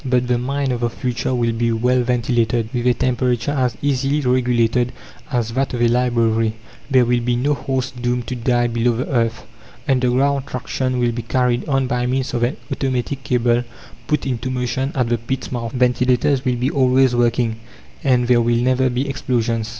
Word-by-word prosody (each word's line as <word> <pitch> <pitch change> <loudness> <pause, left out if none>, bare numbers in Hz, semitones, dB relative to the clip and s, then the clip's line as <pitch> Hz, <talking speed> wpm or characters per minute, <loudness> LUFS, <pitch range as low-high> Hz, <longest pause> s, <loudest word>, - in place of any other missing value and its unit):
But 125 -2 +1
the 125 -1 +1
mine 135 +2 -1
of 120 - -2
the 120 0 0
future 125 +1 -2
will 120 -1 +1
be 115 +1 0
well 125 +3 +2
ventilated, 120 -2 0
with 120 0 -1
a 125 - +5
temperature 125 0 0
as 125 -6 0
easily 140 +1 +1
regulated 125 -2 +1 0.4
as 120 -4 0
that 130 +1 -1
of 120 - -3
a - - +5
library; 115 -2 +1 0.3
there 130 -3 +4
will 120 0 +2
be 120 0 0
no 140 +5 +1
horses 130 -2 -2
doomed 125 -1 -2
to 125 - -4
die 120 0 +1
below 120 0 0
the 125 - -2
earth: 115 -3 0 0.4
underground 135 +1 +1
traction 130 0 -2
will 120 -1 +1
be 120 +1 -4
carried 125 +2 0
on 135 -1 +2
by 125 0 -1
means 130 +1 -1
of 120 - -1
an 120 +5 0
automatic 135 0 -2
cable 120 -1 +1 0.4
put 150 -2 0
into 130 -1 -2
motion 130 +2 -2
at 125 -3 +1
the 120 -1 +1
pit's 130 +3 -4
mouth. 115 -2 -3
Ventilators 125 +2 +2
will 125 -1 +1
be 125 +4 -1
always 130 -1 +3
working, 120 -1 +1 0.5
and 125 -2 +2
there 120 -1 +4
will 120 0 +2
never 130 +2 +2
be 130 +3 -1
explosions. 115 -4 -1
125 Hz, 190 wpm, -20 LUFS, 120-130 Hz, 0.5 s, a